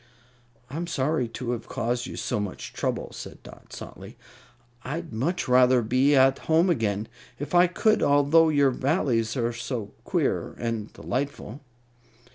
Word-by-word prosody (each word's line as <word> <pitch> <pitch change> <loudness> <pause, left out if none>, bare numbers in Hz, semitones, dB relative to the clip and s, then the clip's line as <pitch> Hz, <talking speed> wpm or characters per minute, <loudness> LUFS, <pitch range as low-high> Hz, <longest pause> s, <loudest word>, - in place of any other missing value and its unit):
"I'm 165 +7 -4
sorry 145 -4 0
to 120 +2 -4
have 120 -2 -4
caused 120 +2 -2
you - - -7
so - - -2
much 105 -2 -5
trouble," - - -2
said - - -9
Dot, - - -14
softly. - - -10 0.7
"I'd 160 +2 -5
much 155 +11 -1
rather 125 -1 +5
be 130 +6 +3
at 135 0 +5
home 165 +3 +4
again, 110 -6 -1 0.3
if 145 - -6
I 175 +1 +6
could, 215 +5 +2
although 145 +3 +5
your 140 -3 +3
Valleys 130 -5 0
are 120 -1 0
so 115 -3 -5
queer - - -1
and 115 -3 -3
delightful." 140 -1 -4
130 Hz, 145 wpm, -26 LUFS, 115-150 Hz, 0.7 s, I